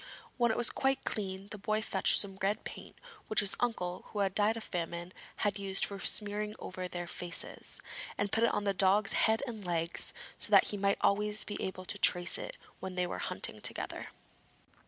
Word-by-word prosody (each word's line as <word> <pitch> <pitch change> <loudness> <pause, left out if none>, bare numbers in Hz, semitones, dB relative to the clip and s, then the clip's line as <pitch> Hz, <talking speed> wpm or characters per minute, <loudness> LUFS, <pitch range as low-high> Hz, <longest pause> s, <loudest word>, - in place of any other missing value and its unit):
When 240 -2 +3
it 220 - 0
was 240 - +4
quite 270 0 0
clean, 195 -2 -3
the 210 - -6
boy 215 +2 0
fetched 190 -3 +4
some 195 -2 +1
red 200 +2 0
paint - - -9 0.3
which 215 - +4
his 200 - 0
uncle 180 -7 -1
who 210 - -5
had 195 -1 +1
died 215 +2 +2
of 225 - -6
famine 170 -1 -4 0.2
had 205 -1 -1
used 195 -1 +4
for 200 -1 -4
smearing 210 +1 +2
over 185 0 -5
their 175 -1 -5
faces, 175 0 -5 0.4
and 205 -1 -1
put 225 - +2
it 235 - +4
on 205 - -1
the 200 -1 +1
dog's 200 +2 +3
head 220 +3 +3
and 225 -5 -6
legs 170 -2 0 0.3
so - - -3
that - - +6
he - - -1
might 200 0 +2
always 210 +1 +4
be 205 - -5
able 185 -1 -4
to 200 - -2
trace 175 -1 +3
it - - -6 0.2
when 190 -1 -6
they 180 0 +1
were 175 - -4
hunting - - -2
together. - - -2
200 Hz, 200 wpm, -32 LUFS, 185-215 Hz, 0.4 s, that